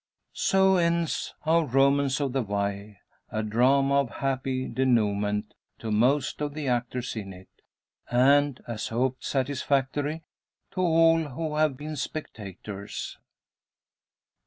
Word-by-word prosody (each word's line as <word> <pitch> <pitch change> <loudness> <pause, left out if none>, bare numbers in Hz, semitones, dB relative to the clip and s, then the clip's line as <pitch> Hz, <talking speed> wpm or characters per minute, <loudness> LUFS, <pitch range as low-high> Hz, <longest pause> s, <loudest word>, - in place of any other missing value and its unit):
So 190 0 +3
ends 170 -1 0
our 165 +1 +4
"Romance 140 0 +2
of 140 -3 -1
the 135 - +1
Wye;" 100 -1 -3 0.3
a 110 0 -1
drama 135 +6 +3
of 140 -3 0
happy 130 -1 -2
denouement 105 -5 0 0.2
to 110 - -5
most 130 +7 +2
of 145 -1 -3
the 150 -3 -4
actors 125 0 -2
in 100 -3 -5
it; 95 +1 -14 0.6
and, 140 +2 +3
as 115 -2 -4
hoped, 130 +3 -1
satisfactory 140 +3 -1 0.5
to 185 - -2
all 165 -1 +5
who 150 +2 -4
have 155 -4 +2
been 155 +2 -6
spectators. 105 - -6
135 Hz, 120 wpm, -27 LUFS, 115-145 Hz, 0.6 s, all